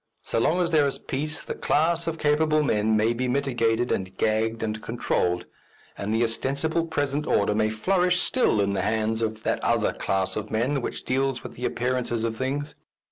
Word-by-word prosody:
So - - -1
long 170 +9 +2
as 175 -1 0
there 150 -3 +4
is 140 - -2
peace 155 +4 -3
the - - -4
class 170 +2 +1
of 165 -1 -2
capable 155 0 +2
men 110 -4 +2
may 110 +2 +2
be 125 +2 -2
mitigated 120 -3 +1
and 95 0 -2
gagged 110 +1 0
and 110 0 -3
controlled, 90 -7 -1 0.5
and 100 +1 -4
the 110 +2 +2
ostensible 140 +8 0
present 145 -1 -1
order 100 +1 +2
may 110 0 +2
flourish 180 - +2
still 245 - +2
in 100 0 +1
the 100 - 0
hands 110 +1 0
of 110 -1 -2
that - - -1
other - - +2
class 95 -1 -1
of 105 0 -4
men 130 +5 0
which - - -5
deals 135 -1 0
with - - -8
the 125 - -5
appearances 125 -2 -1
of 115 -1 -1
things. 140 +4 -3
120 Hz, 190 wpm, -25 LUFS, 110-150 Hz, 0.5 s, there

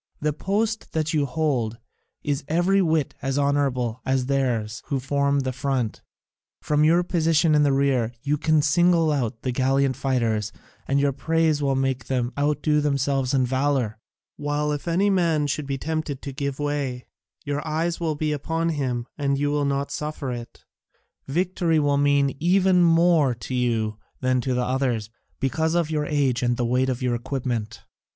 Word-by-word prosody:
The 150 0 0
post 210 +7 -2
that 160 +1 -1
you 145 -2 +1
hold 130 -7 -1 0.5
is 145 -2 -1
every 175 +5 +2
whit 160 -5 +1
as 135 0 -1
honourable 135 -5 0
as 130 -1 0
theirs 125 -5 -1
who 140 - -1
form 140 +1 +1
the 130 -1 -2
front: 130 -4 -2 0.6
from 150 0 +1
your 170 +3 +4
position 165 -2 +2
in 150 - +4
the 145 -1 +3
rear 135 -4 +1
you 145 +1 +1
can 155 -1 +3
single 165 +1 +3
out 120 -6 -2
the 130 - -1
gallant 135 +1 +1
fighters, 115 -5 0 0.4
and 140 +1 +2
your 140 0 +2
praise 160 +2 +1
will 135 -1 +1
make 130 -2 -1
them 125 -1 -1
outdo 150 +1 +1
themselves 140 -2 0
in 130 -1 +3
valour, 130 -4 0 0.4
while 145 +1 -1
if 145 +3 -4
any 190 +4 +2
man 165 -5 +2
should 145 0 -2
be 135 -1 -2
tempted 155 -1 -3
to 140 - -5
give 140 0 -3
way, 145 -4 -2 0.4
your 145 0 -2
eyes 165 +2 -1
will 160 -3 -1
be 150 +1 -1
upon 165 +3 -1
him 130 -6 -2
and 140 -1 +1
you 145 +1 0
will 145 -1 +1
not 140 0 -1
suffer 150 -3 -4
it. 120 -1 -8 0.6
Victory 170 +2 +1
will 145 -2 +2
mean 140 -1 +2
even 185 +2 +3
more 165 -5 +4
to 120 - -7
you 115 -4 0 0.2
than 130 -1 +1
to 130 0 -1
the 125 0 0
others, 125 -5 -1 0.3
because 160 +5 0
of 170 -2 +1
your 150 -1 -1
age 140 -4 +1
and 120 -1 +1
the 120 - 0
weight 125 +2 +1
of 125 0 -3
your 125 -1 +1
equipment. 120 -3 -3
140 Hz, 175 wpm, -24 LUFS, 130-155 Hz, 0.6 s, your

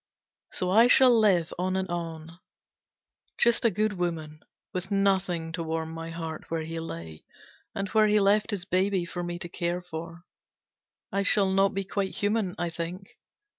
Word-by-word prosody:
So 180 0 -1
I 225 +5 +7
shall 250 -1 +6
live 190 -7 +3
on 185 +1 0
and 190 0 -1
on. 165 -1 -6 1.0
Just 235 -1 +3
a - - +6
good 215 +1 0
woman. 160 -4 -4 0.3
With 185 +1 -4
nothing 190 -4 +1
to 165 +1 -4
warm 160 0 -3
my 165 0 -6
heart 165 -1 -6
where 165 -1 -2
he 165 +1 -5
lay, 80 - -7 0.5
and 195 0 -2
where 215 0 +4
he 210 0 +4
left 205 +1 +3
his 200 -4 -2
baby 185 0 +1
for 175 0 -5
me 175 0 -4
to 175 - -6
care 175 +1 -3
for. 170 0 -8 0.9
I 200 - 0
shall 200 -1 +3
not 195 +1 +2
be 195 - -1
quite 195 0 -3
human, 205 -3 0
I 175 -1 -2
think. 175 +3 -6
180 Hz, 170 wpm, -27 LUFS, 165-195 Hz, 1.0 s, I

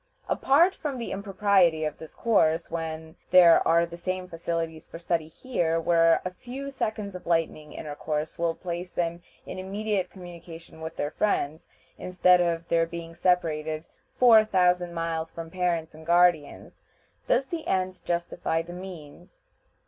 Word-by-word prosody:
Apart 335 +8 +4
from 290 -7 -4
the 235 - -5
impropriety 195 -5 +2
of 155 - -4
this 160 -2 -11
course 170 -9 +2
when 160 -1 -5
there 175 -2 +7
are 170 +1 +4
the 170 0 -9
same 185 +1 -4
facilities 165 -2 -4
for - - -9
study 165 -2 -1
here, 165 -3 -1
where 165 0 +3
a 185 - -3
few 270 +7 -7
seconds 215 -6 -3
of 180 - -9
lightning 165 -3 -1
intercourse 150 +1 -4
will 170 -1 0
place 175 +1 -5
them 170 -1 -2 0.2
in - - -7
immediate 195 0 -2
communication 170 -3 -11
with 160 0 -6
their 145 - -2
friends, 160 -6 -1 0.3
instead 180 0 +4
of 170 -1 -1
their 165 0 +2
being 170 0 -7
separated 160 -3 0 0.3
four 230 -3 +7
thousand 180 -4 +1
miles 165 -1 -2
from 165 -1 -8
parents 170 -3 -1
and 160 +1 -14
guardians, 170 -3 +2 0.5
does 265 - +2
the 325 +3 -5
end 185 0 -1
justify 170 -1 -1
the 175 +1 -10
means? 175 -2 -11
170 Hz, 150 wpm, -26 LUFS, 165-185 Hz, 0.5 s, there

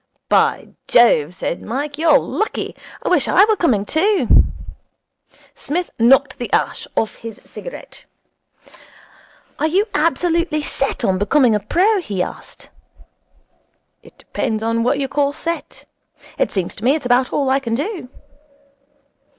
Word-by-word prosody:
'By - - +2 0.2
Jove!' 180 -9 +4
said 170 - -4
Mike, 285 +5 -4
'you're 325 0 +5
lucky. 435 - -3 0.3
I - - -4
wish - - +3
I 400 - +5
were 435 0 +2
coming 240 - +1
too.' 390 - +3 1.1
Psmith 350 +4 -3
knocked 265 +3 +4
the 245 - -5
ash - - -1
off 220 - -1
his 225 -2 -9
cigarette. - - -11 1.5
'Are 310 - +2
you 380 +6 +2
absolutely 330 0 0
set 270 -1 -1
on 185 -1 +1
becoming 240 +4 +3
a 210 - +2
pro?' 375 - +1
he 195 - -2
asked. - - -10 1.3
'It - - -19
depends 220 -1 -3
on 230 0 0
what 250 +4 +1
you 275 -1 -1
call 280 +1 0
set. 335 +2 -5 0.5
It - - +2
seems 190 -4 -3
to 210 - -10
me 265 +5 +3
it's 310 - -5
about 245 +1 +2
all 275 -2 0
I 270 - +3
can 230 -4 -3
do.' 320 - -4
275 Hz, 140 wpm, -19 LUFS, 230-330 Hz, 1.5 s, you're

